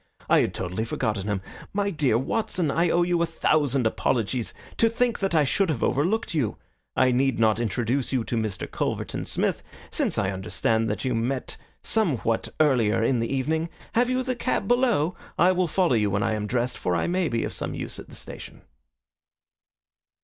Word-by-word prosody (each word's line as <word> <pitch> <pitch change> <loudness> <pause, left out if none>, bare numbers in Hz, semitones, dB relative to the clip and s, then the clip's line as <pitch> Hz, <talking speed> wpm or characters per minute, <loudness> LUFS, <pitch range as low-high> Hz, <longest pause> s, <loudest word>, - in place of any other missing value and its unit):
"I - - +5
had - - 0
totally 90 +4 -2
forgotten 110 -3 -2
him. 100 -2 -1 0.3
My 200 0 0
dear 145 - +2
Watson, 170 - 0
I 170 +3 +2
owe 175 +1 +3
you 175 -1 +1
a 170 - +2
thousand 145 -5 +1
apologies. 115 +1 0 0.3
To 225 - +4
think 240 +1 0
that 195 -3 0
I 155 - +5
should 180 +7 +1
have 145 -8 -1
overlooked 180 - +1
you! 135 -10 0 0.4
I 130 0 +4
need 130 0 +2
not 110 -1 +3
introduce 120 +4 -1
you 130 -3 +1
to 120 - -3
Mr. 110 -4 -2
Culverton - - -3
Smith, - - 0 0.3
since - - 0
I 95 -1 +1
understand 110 +4 0
that 105 - -2
you 130 - +1
met 125 +3 -2 0.3
somewhat 140 - 0
earlier 120 -8 +3
in 125 +1 +2
the 115 - -1
evening. 160 +5 0 0.2
Have 245 +2 +3
you 255 0 +1
the 255 0 -1
cab 240 - -1
below? 235 - +2 0.2
I 180 +2 +5
will 185 -1 +1
follow 180 -2 +2
you 105 -3 +2
when 100 +1 0
I 110 - +1
am 105 -1 -2
dressed, 125 +2 -1
for 90 - 0
I 85 - +1
may 180 -1 +1
be 115 -1 0
of - - -3
some - - -4
use - - -6
at - - -11
the - - -11
station. - - -10
130 Hz, 195 wpm, -25 LUFS, 115-175 Hz, 0.4 s, I